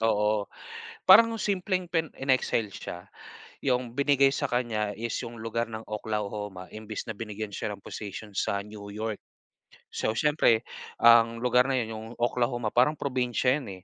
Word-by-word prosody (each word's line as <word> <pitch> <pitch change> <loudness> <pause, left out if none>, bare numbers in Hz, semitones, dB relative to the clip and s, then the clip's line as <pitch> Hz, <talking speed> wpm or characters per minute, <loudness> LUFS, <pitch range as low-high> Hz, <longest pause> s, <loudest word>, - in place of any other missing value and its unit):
oo. 105 -2 +1 0.6
Parang 230 +4 +9
simpleng 185 -2 -1
pen 165 -2 0
in-exile 130 -4 +1
siya. 90 +2 -8 0.5
Yung 125 -3 0
binigay 140 0 +3
sa - - -1
kanya 115 -4 0
is 115 +1 -3
yung 115 0 -7
lugar 115 +1 -2
ng 110 0 -7
Oklahoma 105 -3 -4
imbes 110 0 -6
na 115 - -4
binigyan 105 -1 -6
siya - - -3
ng 100 - -7
position 105 0 -7
sa 100 0 0
New 105 -1 -10
York. 110 +1 -4 0.7
So, 110 - -1
siyempre 145 -5 +3 0.4
ang 115 0 +7
lugar 125 +1 +4
na 135 - +1
yun, 120 -3 -1
yung 110 0 -7
Oklahoma 120 -1 0
parang 130 +6 +3
probinsya 125 0 0
yun, 95 -8 -9
115 Hz, 150 wpm, -28 LUFS, 105-130 Hz, 0.7 s, Parang